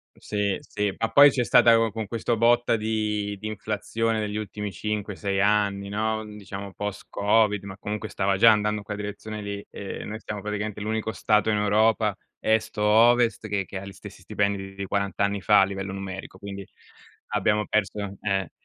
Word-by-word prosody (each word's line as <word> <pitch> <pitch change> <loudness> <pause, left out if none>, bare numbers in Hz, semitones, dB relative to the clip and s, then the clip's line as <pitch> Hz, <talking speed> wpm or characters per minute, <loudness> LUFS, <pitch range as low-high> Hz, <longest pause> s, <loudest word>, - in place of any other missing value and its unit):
Sì, 105 -2 -1
sì, 105 -2 -2
ma 115 - -1
poi 140 0 +8
c'è 125 -2 0
stata 115 +2 +6
co 115 -1 +2
con 110 0 -4
questo 115 +2 -1
botta 120 +1 +4
di 105 -2 -1
di 110 - -5
inflazione 110 +2 -2
degli 105 -1 -3
ultimi 105 -1 -4
5,6 100 0 -2
anni, 100 -1 +1
no, 110 +1 -1
diciamo 100 -2 -8
post-covid, 105 +1 0
ma 100 -1 -8
comunque 105 +1 -4
stava 95 0 0
già 115 +2 +8
andando 105 0 +1
in 105 - -7
quella 105 0 -5
direzione 105 +1 -6
lì. 100 0 -5
Ehm, 100 +1 -6
noi 110 - -5
stiamo 105 -2 -6
praticamente 105 0 -4
l'unico 110 +1 -2
Stato 105 -2 +2
in 105 - +2
Europa, 105 0 +2 0.2
est 110 -1 0
o 105 - 0
ovest, 115 +1 +4
che 100 -2 -1
che 95 - -6
ha 100 - -9
gli - - -8
stessi 95 - -12
stipendi 100 -1 -2
di 100 0 -4
40 100 +1 -1
anni 100 -1 0
fa 105 -1 +5
a - - +6
livello 95 0 -5
numerico, 95 -1 -7
quindi 100 0 -7 0.7
abbiamo 105 0 +1
perso, 100 -1 -1
eh, 95 -3 -1
105 Hz, 185 wpm, -25 LUFS, 100-110 Hz, 0.7 s, poi